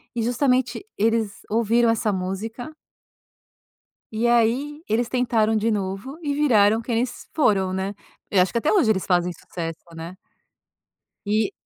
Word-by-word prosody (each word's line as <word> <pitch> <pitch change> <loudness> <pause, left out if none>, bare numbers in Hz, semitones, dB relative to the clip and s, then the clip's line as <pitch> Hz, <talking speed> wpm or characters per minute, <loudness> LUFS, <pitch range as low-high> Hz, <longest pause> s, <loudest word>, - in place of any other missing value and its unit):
E 230 - 0
justamente 250 - +1
eles 220 -1 0
ouviram 230 +2 +3
essa 220 -2 +1
música 205 +9 -4 1.4
e 225 +2 0
aí 245 +6 +1
eles 230 +2 +1
tentaram 230 -3 +1
de 220 +1 +1
novo 200 - -3
e 290 -2 -1
viraram 225 -7 +4
quem 230 0 -2
eles 245 +2 -2
foram, 195 -10 +2
né? 190 +2 -2 0.4
Eu 195 - +4
acho 180 - +3
que 235 - +1
até 295 - +1
hoje 340 - +4
eles 190 -4 +1
fazem 180 -1 +1
sucesso, 165 -1 -6 0.2
né? 165 +2 -7 1.1
E 210 +1 +1
225 Hz, 145 wpm, -23 LUFS, 200-245 Hz, 1.4 s, viraram